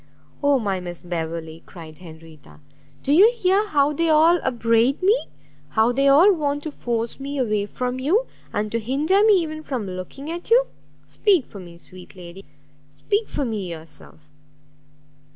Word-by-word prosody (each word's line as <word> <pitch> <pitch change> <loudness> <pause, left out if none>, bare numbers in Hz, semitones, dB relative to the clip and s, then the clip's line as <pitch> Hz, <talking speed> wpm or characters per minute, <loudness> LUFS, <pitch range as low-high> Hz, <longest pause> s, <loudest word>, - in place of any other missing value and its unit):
"Oh 285 -1 +3
my 200 -6 -2
Miss 175 -1 -8
Beverley!" 165 -2 -5
cried 160 -3 -12
Henrietta, 160 -3 -15 0.4
"do 280 - +1
you 405 +9 +7
hear 395 0 +1
how 290 -3 +2
they 330 +3 0
all 320 +3 +5
upbraid 235 +4 +1
me? 420 +6 +2 0.4
how 220 +2 +2
they 275 +3 +1
all 325 +9 +6
want 290 -3 -2
to 310 - -5
force 235 -3 -4
me 280 +1 -5
away 215 -5 -1
from 250 +3 -4
you, 365 - +1 0.3
and 210 0 -3
to 230 - -1
hinder 295 - +1
me 435 -1 +6
even 315 -4 -1
from 260 -8 -4
looking 185 - -7
at 345 +4 -7
you! - - +5 0.4
Speak 380 - +1
for 200 - -12
me, 170 -2 -12
sweet 180 +2 -15
lady! 180 +1 -11 0.5
speak 425 +1 -2
for 285 - -3
me 210 -6 -4
yourself! 160 -1 -12
255 Hz, 165 wpm, -22 LUFS, -, 0.5 s, you